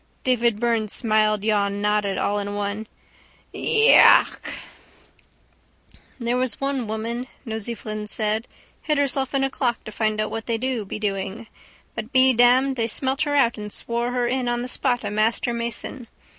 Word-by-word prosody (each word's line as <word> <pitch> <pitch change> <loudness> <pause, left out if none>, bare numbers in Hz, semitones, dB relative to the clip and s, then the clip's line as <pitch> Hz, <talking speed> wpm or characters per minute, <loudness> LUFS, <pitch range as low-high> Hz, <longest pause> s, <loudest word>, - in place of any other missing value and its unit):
Davy 240 -2 +3
Byrne 230 0 -1
smiledyawnednodded 210 -2 +1
all 205 0 0
in 205 0 -4
one: 205 +1 -3 0.7
—Iiiiiichaaaaaaach! 445 +2 +5 1.8
—There 240 -1 -1
was 255 -2 +2
one 275 -4 -2
woman, 230 +3 -4 0.2
Nosey 225 0 -4
Flynn 215 -1 -6
said, 215 +2 0 0.3
hid 300 -2 0
herself 275 -1 0
in 270 - +2
a 270 - +1
clock 245 -4 -2
to 215 - -8
find 215 0 -1
out 215 - -1
what 225 0 -5
they 230 -1 0
do 250 -2 -2
be 195 - -6
doing. 200 +1 -3 0.5
But - - -6
be 260 -1 +5
damned 255 +3 +4
but - - -1
they 225 - +1
smelt 265 +4 0
her 290 -2 0
out 235 -5 +2
and 210 0 -7
swore 235 +3 -2
her 245 -1 0
in 250 0 -1
on 240 0 -1
the - - -4
spot 250 -1 0
a - - -3
master 220 +3 +1
mason. 235 +1 -3
235 Hz, 165 wpm, -23 LUFS, 215-255 Hz, 1.8 s, Iiiiiichaaaaaaach